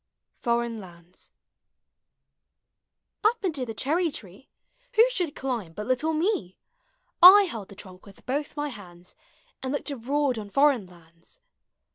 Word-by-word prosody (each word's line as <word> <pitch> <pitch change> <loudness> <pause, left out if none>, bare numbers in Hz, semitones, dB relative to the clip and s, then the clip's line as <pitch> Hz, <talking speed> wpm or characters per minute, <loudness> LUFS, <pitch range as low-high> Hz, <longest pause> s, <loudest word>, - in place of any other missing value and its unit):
FOREIGN 235 -1 -1
LANDS. 175 -2 -15 1.9
Up 435 -1 +1
into 290 -8 -2
the 225 - -6
clierrv 320 +7 0
tree 200 +6 -11 0.5
Who 455 +3 +7
should 355 -11 -2
climb 235 -11 -4
but 210 +5 -6
little 255 +6 0
me? 310 - -1 0.6
I 385 +4 +10
held 225 - -6
the 200 - -12
trunk 185 0 -13
with 195 - -17
both 285 +3 -3
mv 295 -1 -3
hands 180 -5 -13 0.5
And 260 - -3
looked 285 +1 -2
abroad 275 0 -1
on 205 -1 -8
foreign 275 -4 +3
lauds. 170 - -18
250 Hz, 135 wpm, -26 LUFS, 195-295 Hz, 1.9 s, I